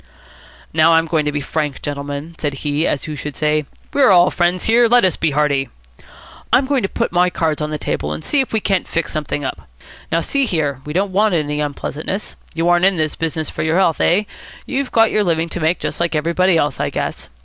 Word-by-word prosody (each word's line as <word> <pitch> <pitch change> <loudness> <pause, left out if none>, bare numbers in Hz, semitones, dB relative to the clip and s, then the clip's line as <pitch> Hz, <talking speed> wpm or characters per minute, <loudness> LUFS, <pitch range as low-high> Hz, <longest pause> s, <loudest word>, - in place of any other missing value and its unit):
"Now, 160 +1 +5
I'm 165 0 +4
going 155 -2 0
to 150 - 0
be 145 0 -2
frank, 150 0 -3
gentlemen," 145 +2 -5
said 145 -2 -2
he, 150 +2 +1
as 140 - -1
who 155 - -5
should 150 0 -6
say, 150 -1 0 0.3
"We 285 - +1
are 260 - +6
all 180 -2 +6
friends 175 +1 0
here. 235 +1 +4
Let 240 -2 +5
us 185 - +2
be 160 - 0
hearty." 140 -2 +1 0.8
"I'm 250 +3 +4
going 275 -1 +1
to 195 - -1
put - - -2
my 180 +1 +3
cards 160 -4 -1
on 150 - -2
the 155 - -3
table, 75 - -3
and 75 +1 -5
see 285 - +3
if 265 - -4
we 220 - +1
can't 195 -3 0
fix 165 - -2
something 150 -2 -3
up. 130 - -6 0.4
Now, 165 +1 +2
see 275 +7 +1
here: 145 - -1
We 150 - -5
don't 195 +3 0
want 205 0 +2
unpleasantness. 150 +4 -3 0.2
You 165 +1 0
aren't 175 +1 +4
in 195 -2 +3
this 155 -1 -1
business 160 -1 -3
for - - -4
your 160 +2 +1
healths, 180 -4 +2
eh? 185 +5 +3 0.4
You've 275 -1 -2
got 225 -1 +4
your 210 - +2
living 165 -2 0
to 175 - -4
make, 160 +2 +1
just - - -4
like 170 -1 0
everybody 170 +3 +2
else, 145 -3 0
I - - 0
guess. 65 - -4
165 Hz, 230 wpm, -18 LUFS, 150-185 Hz, 0.8 s, are